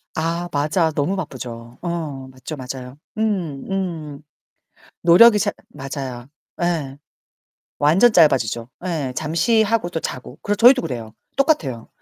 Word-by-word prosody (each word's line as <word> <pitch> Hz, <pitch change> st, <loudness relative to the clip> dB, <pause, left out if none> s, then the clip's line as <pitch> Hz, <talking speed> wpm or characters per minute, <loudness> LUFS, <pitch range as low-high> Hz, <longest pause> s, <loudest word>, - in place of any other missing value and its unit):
아 170 Hz, +2 st, -2 dB
맞아. 155 Hz, +3 st, +1 dB
너무 155 Hz, +6 st, -1 dB
바쁘죠. 120 Hz, -8 st, -7 dB
어, 155 Hz, -6 st, -4 dB
맞죠 130 Hz, +4 st, -8 dB
맞아요. 130 Hz, 0 st, -7 dB, 0.2 s
음 185 Hz, -10 st, -1 dB
음. 165 Hz, -7 st, -4 dB, 0.8 s
노력이 210 Hz, +6 st, +7 dB
잘 205 Hz, -1 st, 0 dB, 0.2 s
맞아요. 135 Hz, -, -6 dB, 0.3 s
예. 155 Hz, -6 st, -1 dB, 0.8 s
완전 175 Hz, +11 st, +5 dB
짧아지죠. 130 Hz, -, +3 dB, 0.2 s
예, 150 Hz, -7 st, -2 dB
잠시하고 220 Hz, +6 st, +1 dB
또 165 Hz, -, -3 dB
자고. 130 Hz, -, -6 dB
그래서 205 Hz, 0 st, 0 dB
저희도 255 Hz, +4 st, +7 dB
그래요. 115 Hz, -4 st, -5 dB, 0.2 s
똑같아요. 160 Hz, -, +1 dB
155 Hz, 255 characters per minute, -21 LUFS, 130-185 Hz, 0.8 s, 노력이